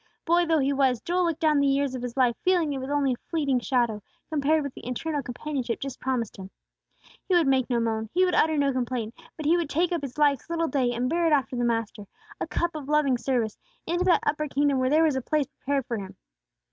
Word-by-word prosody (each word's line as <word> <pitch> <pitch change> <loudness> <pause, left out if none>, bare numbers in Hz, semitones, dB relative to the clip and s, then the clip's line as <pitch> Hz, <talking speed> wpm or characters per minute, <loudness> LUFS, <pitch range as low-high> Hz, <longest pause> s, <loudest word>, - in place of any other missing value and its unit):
Boy 345 +1 +3
though 325 -1 +3
he 280 -1 +1
was, 265 -3 +2
Joel 355 +5 0
looked 330 -1 -2
down 305 -2 +3
the 280 - +3
years 275 -1 +1
of 255 - -4
his 245 +1 -6
life 250 -3 +3
feeling 350 -5 +2
it 270 - -3
was 260 +1 -5
only 285 -2 +1
a 245 - -12
fleeting 285 -6 +1
shadow, 235 -4 0 0.3
compared 305 +1 +2
with 280 -2 -5
the - - -10
eternal 290 +4 -2
companionship 250 -1 -4
just 270 -2 -6
promised 250 -4 -2
him. 190 -1 -9 0.8
He 375 - +2
would 345 -2 +4
make 265 -2 +2
no 240 -2 +1
moan; 220 -1 -1
he 370 +1 +3
would 360 - 0
utter 315 -2 +3
no 280 -1 +2
complaint: 245 -3 -2 0.2
but 310 - -6
he 330 +4 +4
would 335 -4 -2
take 335 +5 +1
up 340 -3 -1
his 275 -2 -7
life's 290 -1 +2
little 330 -1 0
day, 260 -5 +1
and 245 +1 -1
bear 335 +4 +1
it 315 - +3
after 270 -3 +1
the 245 - -1
Master, 225 -3 -2 0.3
a - - -3
cup 345 0 -1
of 295 -3 -7
loving 290 -5 +2
service, 235 -4 -1 0.3
into 350 +2 0
that 360 - +3
upper 305 0 0
kingdom 280 -1 +1
where 255 0 +1
there 310 +3 +4
was 310 -4 +2
a 265 - -1
place 300 +3 0
prepared 275 -1 -3
for 235 - -3
him. 190 -1 -9
275 Hz, 250 wpm, -26 LUFS, 250-310 Hz, 0.8 s, would